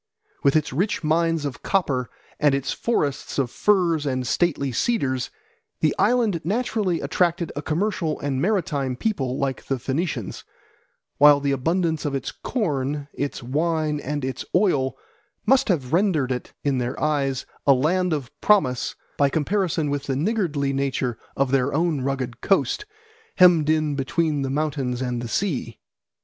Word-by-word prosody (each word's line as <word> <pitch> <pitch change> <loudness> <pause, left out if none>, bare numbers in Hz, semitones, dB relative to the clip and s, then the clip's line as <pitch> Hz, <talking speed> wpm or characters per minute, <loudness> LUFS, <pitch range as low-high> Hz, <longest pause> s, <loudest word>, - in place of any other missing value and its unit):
With 140 +1 +3
its 155 -3 +1
rich 185 +8 0
mines 165 0 +1
of 140 -3 -5
copper 140 -10 0 0.3
and 145 -2 +4
its 140 0 -2
forests 145 - -1
of 130 -4 0
firs 175 -7 +2
and 130 -2 -1
stately 140 -2 +1
cedars, 130 - 0 0.5
the - - +2
island 225 -9 +2
naturally 210 -2 0
attracted 175 -1 0
a 145 - -3
commercial 165 0 -1
and 135 -2 -2
maritime 155 -10 0
people 135 - -1
like 135 -2 -2
the 135 - -1
Phoenicians; 135 - -3 0.8
while 145 0 +8
the 140 0 0
abundance 160 +4 0
of 145 -2 -1
its 135 - -3
corn, 145 - -2
its 140 -3 -4
wine, 155 +3 0
and 145 -1 -3
its 130 -1 -4
oil 160 -9 +2 0.5
must 265 -1 +4
have 145 -7 0
rendered 165 -8 +2
it 125 - -4
in 140 -3 +1
their 125 +1 -3
eyes 140 -4 0 0.2
a 140 - +8
Land 175 +7 +1
of 140 -6 -2
Promise 130 -13 +2 0.2
by 140 -1 +4
comparison 160 0 0
with 145 0 -2
the 135 - -1
niggardly 150 - 0
nature 135 -3 -1 0.2
of 135 -1 +1
their 135 +1 +2
own 160 -3 +1
rugged 130 -2 -3
coast, 200 - +1 0.5
hemmed 170 -4 +6
in 155 -1 +2
between 150 +2 0
the 135 - -2
mountains 135 -4 -1
and 125 -2 -2
the 120 - -4
sea. 130 - -2
145 Hz, 155 wpm, -23 LUFS, 135-170 Hz, 0.8 s, while